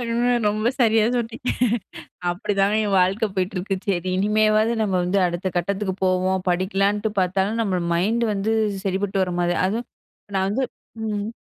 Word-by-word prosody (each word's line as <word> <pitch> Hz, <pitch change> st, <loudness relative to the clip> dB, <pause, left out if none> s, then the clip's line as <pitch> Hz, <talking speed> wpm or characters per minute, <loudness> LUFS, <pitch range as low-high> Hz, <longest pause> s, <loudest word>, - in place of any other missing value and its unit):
.அ, -, -, -3 dB, 0.5 s
ரொம்ப 215 Hz, +2 st, 0 dB
சரியா 225 Hz, -2 st, +4 dB
சொன்னீங்க. 240 Hz, +1 st, -3 dB, 0.8 s
அப்படிதான் 195 Hz, +2 st, 0 dB
என் 205 Hz, -1 st, 0 dB
வாழ்க்கை 190 Hz, +5 st, +2 dB
போயிட்டுருக்கு. 190 Hz, 0 st, -1 dB
சரி 185 Hz, -2 st, 0 dB
இனிமேவாவது 215 Hz, +3 st, +3 dB
நம்ம 200 Hz, -3 st, 0 dB
வந்து 180 Hz, +3 st, +1 dB
அடுத்த 175 Hz, +2 st, -2 dB
கட்டத்துக்கு 190 Hz, +2 st, -1 dB
போவோம், 185 Hz, 0 st, +1 dB
படிக்கலான்ட்டு 195 Hz, +4 st, +1 dB
பாத்தாலும் 190 Hz, +4 st, 0 dB
நம்மளோட 185 Hz, -5 st, -1 dB
மைண்டு 220 Hz, +7 st, +1 dB
வந்து, 205 Hz, +2 st, -1 dB, 0.3 s
சரிப்பட்டு 195 Hz, 0 st, 0 dB
வர 180 Hz, -1 st, -1 dB
மாரி 175 Hz, 0 st, +1 dB
அதுவும் 225 Hz, +5 st, -3 dB, 0.5 s
நான் 190 Hz, 0 st, +1 dB
வந்து 260 Hz, +6 st, 0 dB, 0.4 s
ம். 210 Hz, 0 st, -3 dB
195 Hz, 140 wpm, -23 LUFS, 185-215 Hz, 0.8 s, சரியா